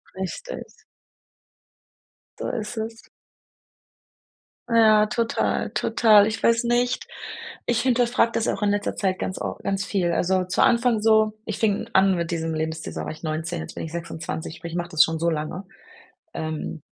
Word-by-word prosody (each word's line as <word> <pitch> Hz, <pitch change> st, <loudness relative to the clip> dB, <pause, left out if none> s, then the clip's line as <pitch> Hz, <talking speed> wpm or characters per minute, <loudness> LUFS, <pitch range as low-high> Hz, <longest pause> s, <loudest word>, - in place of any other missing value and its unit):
Richtig. 190 Hz, -, -5 dB, 1.8 s
So -, -, -3 dB
ist 220 Hz, 0 st, -4 dB
es. 225 Hz, +1 st, -6 dB, 1.6 s
Ja, 215 Hz, -2 st, +6 dB
total, 230 Hz, +1 st, 0 dB
total, 215 Hz, -3 st, +5 dB
ich 220 Hz, -, -4 dB
weiß 230 Hz, +1 st, +3 dB
nicht 245 Hz, +1 st, +1 dB, 0.6 s
ich 240 Hz, -1 st, +2 dB
hinterfrage 245 Hz, -2 st, +2 dB
das 230 Hz, -, 0 dB
auch -, -, -2 dB
in 205 Hz, -, +2 dB
letzter 205 Hz, 0 st, -1 dB
Zeit 185 Hz, -1 st, -1 dB
ganz 190 Hz, -, -3 dB
of -, -, -3 dB
ganz 195 Hz, 0 st, -1 dB
viel. 180 Hz, -4 st, 0 dB
Also, 185 Hz, +2 st, +1 dB
zu 185 Hz, -, 0 dB
Anfang 235 Hz, -2 st, +3 dB
so 220 Hz, -1 st, +4 dB
ich 215 Hz, -, -4 dB
fing 210 Hz, -3 st, 0 dB
an 190 Hz, 0 st, +5 dB
mit 170 Hz, -1 st, -2 dB
diesem 165 Hz, -1 st, -2 dB
Lebensstil, 160 Hz, 0 st, -3 dB
so, -, -, -4 dB
da -, -, -5 dB
war -, -, -4 dB
ich 155 Hz, -, -15 dB
19, 160 Hz, +2 st, -3 dB
jetzt -, -, -8 dB
bin -, -, -5 dB
ich 160 Hz, -, -8 dB
26, 165 Hz, -1 st, -5 dB
sprich, 165 Hz, 0 st, -7 dB
ich -, -, -2 dB
mache 175 Hz, 0 st, -3 dB
das 160 Hz, -2 st, +6 dB
schon 160 Hz, -1 st, -2 dB
so 170 Hz, +1 st, +2 dB
lange. 160 Hz, +4 st, -3 dB, 0.7 s
Ähm. 155 Hz, 0 st, -4 dB
195 Hz, 170 wpm, -24 LUFS, 165-225 Hz, 1.8 s, Ja